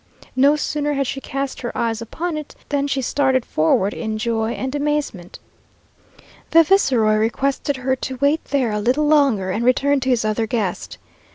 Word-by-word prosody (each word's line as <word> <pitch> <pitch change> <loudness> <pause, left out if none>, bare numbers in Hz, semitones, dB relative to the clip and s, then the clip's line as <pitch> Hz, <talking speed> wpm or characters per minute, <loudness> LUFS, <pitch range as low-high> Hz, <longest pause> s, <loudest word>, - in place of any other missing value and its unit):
No 280 +3 +5
sooner 295 0 -1
had 275 -1 0
she 270 +2 -4
cast 275 0 -4
her 240 - -3
eyes 230 -1 -1
upon 320 +9 -4
it 305 -1 -7
than 285 -1 0
she 275 -2 -1
started 265 -1 +1
forward 185 +6 +1
in 220 -2 -4
joy 225 0 -1
and 260 +1 -4
amazement. 290 -11 -2 1.1
The 330 0 +6
viceroy 250 - +3
requested 270 +5 -1
her 260 +1 0
to 260 0 -5
wait 285 +4 +1
there 265 -5 0
a 210 - -1
little 260 +7 +1
longer, 275 -11 +3
and 215 +5 -2
returned 275 +3 +2
to 260 - -1
his 240 -3 +1
other 215 +1 0
guest. 210 -5 -3
260 Hz, 175 wpm, -20 LUFS, 225-285 Hz, 1.1 s, The